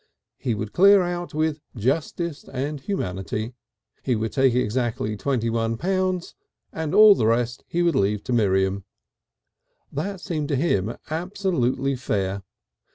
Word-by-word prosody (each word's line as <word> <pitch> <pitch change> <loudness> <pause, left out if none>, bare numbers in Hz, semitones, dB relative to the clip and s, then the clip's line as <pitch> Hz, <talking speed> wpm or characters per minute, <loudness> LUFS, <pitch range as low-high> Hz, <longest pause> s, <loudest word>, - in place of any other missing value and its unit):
He 120 -4 -1
would 105 0 -5
"clear 195 +1 +6
out," 175 -2 -4
with 155 -1 0
justice 145 - -2
and 140 +3 -3
humanity. 110 - -3 0.5
He 125 - 0
would 110 0 -2
take 135 -3 +3
exactly 115 -2 -1
twenty 120 0 -1
one 115 0 0
pounds, 185 +1 -1 0.4
and 160 -2 -2
all 215 -1 +9
the 110 - +1
rest 120 +1 0
he 175 +1 0
would 170 -1 +3
leave 105 -4 +1
to 125 - -2
Miriam. 95 -3 +2 1.1
That 190 +6 -3
seemed 155 -6 -3
to 140 - 0
him 115 - 0
absolutely 155 -7 0
fair. 100 -6 -2
130 Hz, 140 wpm, -24 LUFS, 110-170 Hz, 1.1 s, all